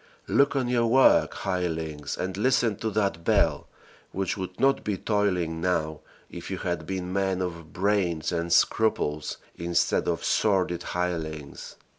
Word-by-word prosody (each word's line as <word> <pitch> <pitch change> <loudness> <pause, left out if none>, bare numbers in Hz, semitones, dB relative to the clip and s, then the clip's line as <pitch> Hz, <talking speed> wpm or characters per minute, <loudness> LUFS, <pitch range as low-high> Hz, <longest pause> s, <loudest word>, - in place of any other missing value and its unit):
Look 140 0 +3
on 130 -3 +1
your 120 -1 +2
work, 130 +3 +5
hirelings, 80 -6 -3
and 95 0 -3
listen 115 0 +2
to 110 - -2
that 100 -5 -1
bell, - - +2 0.4
which 95 -1 -2
would 95 -1 -6
not 135 +2 +3
be 105 -2 -1
tolling 90 -6 0
now 80 -4 0 0.3
if - - -9
you - - -3
had 85 -3 -3
been 90 -1 -3
men 95 -1 0
of 85 -4 -5
brains 90 -4 0
and 85 0 -2
scruples 75 -9 +1 0.2
instead 85 0 +1
of 85 -3 -1
sordid 90 -5 +1
hirelings. 80 -6 -4
90 Hz, 145 wpm, -26 LUFS, 85-105 Hz, 0.4 s, work